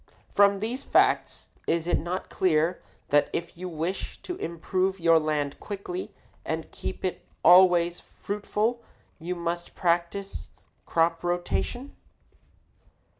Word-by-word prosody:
From 200 -1 +5
these 240 +5 -2
facts - - +2 0.2
is 165 0 +1
it 175 - +2
not 175 +4 -3
clear 170 0 +2 0.3
that 145 0 +4
if 170 - -3
you 180 +2 -6
wish 170 +3 -4
to 360 - -4
improve 185 - -1
your 165 -1 +5
land 150 -2 -1
quickly 215 - -5 0.3
and - - -4
keep - - -5
it - - -3 0.2
always 175 -1 +6
fruitful 210 +3 -2 0.4
you 175 +3 -3
must 170 0 -3
practice 175 +3 -1 0.4
crop 165 0 +2
rotation? 175 +9 -2
175 Hz, 120 wpm, -27 LUFS, 170-200 Hz, 0.4 s, always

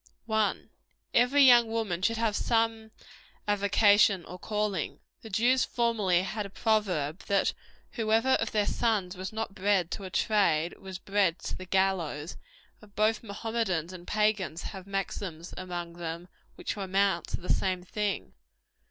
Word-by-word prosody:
1. 220 -2 0 0.4
Every 255 +4 +5
young 240 -3 +7
woman 220 -6 -2
should 230 +4 +1
have 225 -2 0
some 225 -1 0 0.6
avocation, 205 -2 +4
or 180 - -9
calling. 210 -6 -2 0.2
The 225 - -10
Jews 240 +6 +3
formerly 215 -7 +1
had 210 +2 -3
a 200 - -8
proverb, 195 -8 0
that 200 -1 +2 0.4
whoever 225 +2 +1
of 225 -4 +2
their 210 -1 +2
sons 210 -7 0
was 185 +1 -5
not 220 -2 -4
bred 190 -3 +1
to 200 - -4
a 190 - -6
trade, 175 -5 +1
was 190 -1 -7
bred 195 -2 +1
to - - -4
the 185 - -9
gallows; 175 -5 0 0.5
and 210 -2 -18
both 215 +1 +2
Mohammedans 200 -5 -2
and 175 -1 -11
Pagans 210 -6 0
have 190 -1 -8
maxims 190 -3 -4
among 175 -2 -5
them 170 +1 -6 0.3
which - - -4
amount 195 -3 0
to - - -3
the 180 - 0
same 185 -2 -1
thing. 205 +2 -3
200 Hz, 150 wpm, -29 LUFS, 180-220 Hz, 0.6 s, young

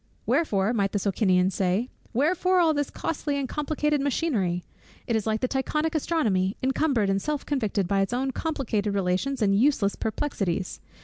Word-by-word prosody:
"Wherefore" 215 -9 +1
(might 200 -4 0
the - - +2
Socinian 190 -2 +2
say) 195 +6 0 0.2
"Wherefore 355 +8 +2
all 330 -3 +4
this 290 -2 -1
costly 290 -2 -2
and 275 -2 -2
complicated 300 0 0
machinery? 225 - 0 0.4
It 235 - 0
is 220 -1 -1
like 220 0 0
the 255 - +1
Tychonic 300 +4 -1
astronomy, 220 - 0
encumbered 265 -4 +1
and 195 0 0
self 300 +2 -2
convicted 215 -9 0
by 195 +1 +2
its 195 - -1
own 260 +2 0
complicated 235 -10 -2
relations 195 +7 0
and 195 -1 +3
useless 220 -3 +2
perplexities. 195 -7 -2
235 Hz, 165 wpm, -26 LUFS, 195-295 Hz, 0.4 s, all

